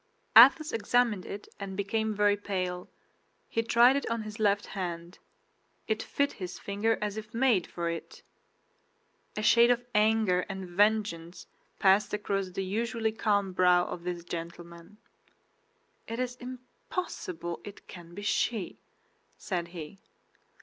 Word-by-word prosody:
Athos 275 +7 +8
examined 225 -3 +1
it 205 - -7
and 195 -1 -6
became 220 +2 -1
very 205 0 +3
pale. 185 -3 -4 0.6
He 230 - 0
tried 235 +3 +5
it 280 - -2
on 230 -1 -2
his 215 +1 -8
left 205 -1 +2
hand; 175 -2 -6 0.7
it 220 0 0
fit 285 0 0
his 180 -3 -7
finger 205 +3 -1
as 210 0 -3
if 220 +1 -8
made 235 -7 +2
for 170 -1 -4
it. 170 - -6 1.1
A 215 - -2
shade 235 +2 +6
of 245 0 +1
anger 215 -3 +3
and 190 -1 -5
vengeance 190 -3 0 0.3
passed 200 +2 +3
across 195 -2 -2
the 190 +1 -4
usually 225 +3 -1
calm 205 -3 0
brow 180 -1 +4
of 175 - -6
this 175 -1 -4
gentleman. 170 +2 -8 1.1
"It 230 +2 -5
is 250 -1 -2
impossible 250 - -6
it 205 - -11
can 175 -1 -12
be 205 - -7
she," 210 -1 -1 0.6
said 175 -3 -3
he. 170 +2 -9
205 Hz, 135 wpm, -29 LUFS, 180-225 Hz, 1.1 s, Athos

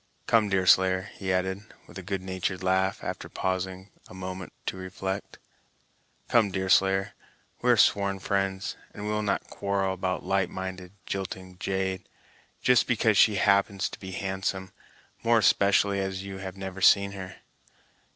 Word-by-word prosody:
Come, 110 -3 +3
Deerslayer," 95 0 +3
he 95 -1 -3
added, 95 +1 0 0.2
with - - -16
a - - -6
good 95 0 -4
natured 95 0 -3
laugh, 95 +1 +1
after - - -5
pausing 95 +1 -3 0.2
a - - -13
moment 95 0 -6
to - - -2
reflect, 95 +1 -5 0.9
"come, 115 -4 +4
Deerslayer, 95 +1 +2 0.5
we - - +1
are - - +6
sworn 100 -1 +3
friends, 95 0 -1 0.2
and 105 - -6
will 105 0 0
not 100 -2 -2
quarrel 100 -1 -1
about 95 0 -2
a - - -14
light 95 -1 +1
minded, 95 -1 -6
jilting 95 -1 -5
jade, 95 -1 -2 0.5
just 125 -1 +4
because 110 -3 +2
she 105 +1 +5
happens 100 -1 +2
to - - -10
be 95 -1 -8
handsome; 95 0 -3 0.5
more 115 0 +4
especially 100 -1 +3
as 95 0 -3
you 100 -1 -7
have 95 0 -7
never 95 0 -6
seen 100 +1 +5
her. 95 -2 -8
95 Hz, 150 wpm, -27 LUFS, 95-100 Hz, 0.9 s, are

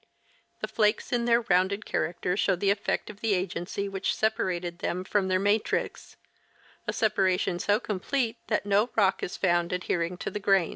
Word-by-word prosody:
The - - -2
flakes 215 +4 +1
in 240 -1 +1
their 235 0 +4
rounded 200 -1 +1
character 180 +1 -1
show 190 -1 +2
the 195 +3 +2
effect 200 +1 -1
of 210 +1 -17
the 220 -3 +2
agency 185 +2 -3
which 195 -1 -1
separated 180 -5 -1
them 180 +1 -2
from 195 0 0
their 185 0 +2
matrix; 205 +3 -1 0.7
a - - +1
separation 190 -5 +1
so 205 +2 +2
complete 230 +3 -2
that 210 -2 0
no 205 +4 +3
rock 195 -3 +3
is - - -4
found 175 -2 +1
adhering 180 -1 -1
to - - -4
the 210 - -3
grains. 195 -4 +3
195 Hz, 175 wpm, -28 LUFS, 180-210 Hz, 0.7 s, their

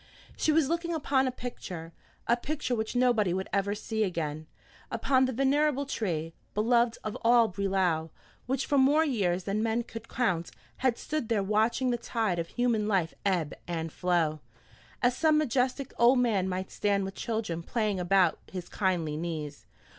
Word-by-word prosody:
She 310 - +2
was 305 -2 +3
looking 340 +1 -1
upon 275 -3 +1
a - - 0
picture, 180 -10 -7 0.3
a 235 - +4
picture 280 +1 -3
which 220 0 -2
nobody 230 -7 +3
would 190 0 -3
ever 200 +1 +1
see 220 +1 -2
again; 155 -5 -3 0.4
upon 260 -1 +2
the 260 - -1
venerable 280 +2 +2
tree, 165 - -2 0.2
beloved 235 +2 +3
of 215 -1 -4
all 235 0 +5
Brelau, 185 -5 0 0.4
which 265 +1 0
for 285 - +2
more 290 +4 +5
years 190 - 0
than 205 +3 -1
men 225 +1 0
could 225 0 -9
count, 180 -9 0 0.3
had 255 -3 +1
stood 305 -7 -3
there 215 -4 +2
watching 220 +5 +1
the 240 - 0
tide 225 -6 -1
of 165 - -2
human 235 -2 0
life 185 -6 +1
ebb 180 -7 0
and 165 -2 -3
flow, 170 -4 +1 0.6
as 245 0 +3
some 310 +1 +3
majestic 265 -1 0
old 240 +3 +6
man 210 -7 +2
might 185 +1 -3
stand 200 -1 0
with 195 - -5
children 215 -7 -3
playing 210 +1 -1
about 180 -1 +3
his 180 -2 -6
kindly 175 -6 0
knees. 155 -3 -5
215 Hz, 170 wpm, -29 LUFS, 180-250 Hz, 0.6 s, old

